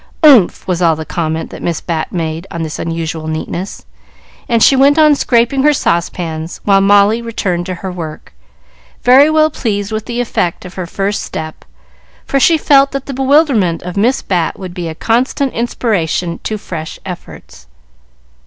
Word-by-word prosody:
"Umph!" 260 Hz, -, +5 dB
was 180 Hz, -1 st, -1 dB
all 165 Hz, -2 st, +3 dB
the 160 Hz, 0 st, -6 dB
comment 160 Hz, -1 st, -3 dB
that -, -, -9 dB
Miss 170 Hz, -, -2 dB
Bat 165 Hz, -2 st, -3 dB
made 165 Hz, 0 st, -4 dB
on 170 Hz, -1 st, -4 dB
this 155 Hz, -1 st, -5 dB
unusual 165 Hz, -1 st, -4 dB
neatness, 160 Hz, -, -5 dB, 0.6 s
and 230 Hz, -2 st, +3 dB
she 275 Hz, -, +6 dB
went 280 Hz, +3 st, +4 dB
on 305 Hz, -1 st, +6 dB
scraping 245 Hz, -1 st, +1 dB
her 300 Hz, +2 st, +4 dB
saucepans, 170 Hz, -, -2 dB
while 195 Hz, -1 st, +4 dB
Molly 205 Hz, +3 st, +4 dB
returned 190 Hz, -6 st, -3 dB
to 185 Hz, -, -3 dB
her 190 Hz, -, -3 dB
work, 160 Hz, -, -8 dB, 0.7 s
very 270 Hz, +4 st, +6 dB
well 310 Hz, 0 st, +3 dB
pleased 205 Hz, -2 st, -3 dB
with 215 Hz, 0 st, -4 dB
the 240 Hz, 0 st, -3 dB
effect 185 Hz, -8 st, -2 dB
of 180 Hz, -, -9 dB
her 185 Hz, -2 st, -5 dB
first 200 Hz, +3 st, -2 dB
step, 155 Hz, 0 st, -7 dB, 0.6 s
for 275 Hz, -, 0 dB
she 330 Hz, +4 st, +4 dB
felt 275 Hz, -2 st, +4 dB
that 275 Hz, -1 st, -4 dB
the 275 Hz, -, -6 dB
bewilderment 265 Hz, -, +2 dB
of 180 Hz, 0 st, -6 dB
Miss 235 Hz, +6 st, +1 dB
Bat 175 Hz, -4 st, -1 dB
would 185 Hz, -2 st, -8 dB
be 175 Hz, -1 st, -5 dB
a 160 Hz, -, -6 dB
constant 250 Hz, -, 0 dB
inspiration 180 Hz, -8 st, -1 dB
to 215 Hz, -, -2 dB
fresh 165 Hz, -5 st, -7 dB
efforts. 175 Hz, -, -10 dB
195 Hz, 170 wpm, -14 LUFS, 170-250 Hz, 0.7 s, she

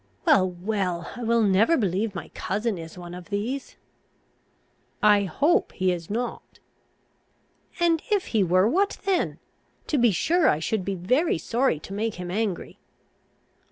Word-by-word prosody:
"Well, 185 Hz, -1 st, +5 dB
well, 180 Hz, -1 st, -3 dB
I 245 Hz, -, -8 dB
will 230 Hz, 0 st, +2 dB
never 210 Hz, -, +4 dB
believe 200 Hz, 0 st, -1 dB
my 175 Hz, -, -6 dB
cousin 210 Hz, -1 st, -2 dB
is 165 Hz, +1 st, -9 dB
one 175 Hz, -1 st, -8 dB
of 180 Hz, +1 st, -10 dB
these." 230 Hz, +7 st, -3 dB, 1.3 s
"I 205 Hz, -1 st, +5 dB
hope 290 Hz, -, +1 dB
he 185 Hz, 0 st, +1 dB
is 170 Hz, -2 st, -5 dB
not." 235 Hz, +4 st, -4 dB, 1.2 s
"And 335 Hz, -2 st, +3 dB
if 410 Hz, -3 st, +1 dB
he 215 Hz, -3 st, +4 dB
were, 185 Hz, +2 st, +3 dB
what 390 Hz, -, +1 dB
then? 385 Hz, -3 st, 0 dB, 0.5 s
To 295 Hz, -, 0 dB
be 240 Hz, 0 st, +5 dB
sure 315 Hz, -, +2 dB
I -, -, +2 dB
should 185 Hz, +4 st, -2 dB
he 195 Hz, -, -1 dB
very 250 Hz, -, +1 dB
sorry 230 Hz, -, 0 dB
to 195 Hz, -, -9 dB
make 215 Hz, +2 st, -2 dB
him 180 Hz, 0 st, -6 dB
angry." 205 Hz, -2 st, -3 dB
205 Hz, 155 wpm, -25 LUFS, 180-245 Hz, 1.3 s, Well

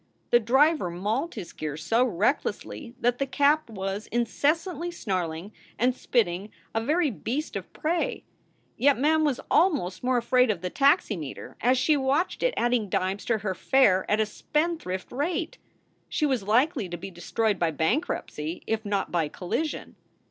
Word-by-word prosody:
The 240 Hz, -, +7 dB
driver 265 Hz, -, +3 dB
mauled 215 Hz, -, -2 dB
his 195 Hz, -6 st, -7 dB
gears 150 Hz, 0 st, -5 dB
so 230 Hz, +2 st, +3 dB
recklessly 240 Hz, +3 st, -1 dB
that 245 Hz, +1 st, +1 dB
the 275 Hz, -, 0 dB
cab 285 Hz, +2 st, +2 dB
was 195 Hz, 0 st, -4 dB
incessantly 300 Hz, -, 0 dB
snarling 185 Hz, -, -3 dB, 0.3 s
and 250 Hz, +3 st, +2 dB
spitting, 205 Hz, -6 st, 0 dB, 0.2 s
a 225 Hz, -, 0 dB
very 305 Hz, +3 st, +2 dB
beast 260 Hz, +8 st, -4 dB
of -, -, -5 dB
prey. 330 Hz, +2 st, -1 dB, 0.5 s
Yet 280 Hz, +1 st, +4 dB
Mem 310 Hz, +4 st, +3 dB
was 285 Hz, -5 st, +1 dB
almost 280 Hz, -, +2 dB
more 255 Hz, 0 st, +2 dB
afraid 250 Hz, +1 st, +3 dB
of 195 Hz, -6 st, 0 dB
the 180 Hz, 0 st, -3 dB
taximeter, 225 Hz, -, +1 dB
as 250 Hz, +2 st, +3 dB
she 305 Hz, +4 st, +3 dB
watched 280 Hz, +6 st, 0 dB
it -, -, +1 dB
adding 240 Hz, -4 st, +1 dB
dimes 190 Hz, +2 st, -1 dB
to 230 Hz, -, +1 dB
her 200 Hz, -2 st, -2 dB
fare 190 Hz, -2 st, +3 dB
at 210 Hz, -, +2 dB
a 220 Hz, -, +3 dB
spendthrift 300 Hz, -, -2 dB
rate. 320 Hz, -, -2 dB, 0.5 s
She 305 Hz, -, 0 dB
was 265 Hz, -6 st, +1 dB
likely 230 Hz, -, +1 dB
to 175 Hz, -, -5 dB
be 190 Hz, +3 st, -8 dB
destroyed 205 Hz, +4 st, -1 dB
by 170 Hz, -, +2 dB
bankruptcy 160 Hz, -, -2 dB
if 220 Hz, 0 st, -1 dB
not 205 Hz, -2 st, -1 dB
by 165 Hz, -3 st, +1 dB
collision. 240 Hz, -, -4 dB
235 Hz, 160 wpm, -26 LUFS, 190-290 Hz, 0.5 s, The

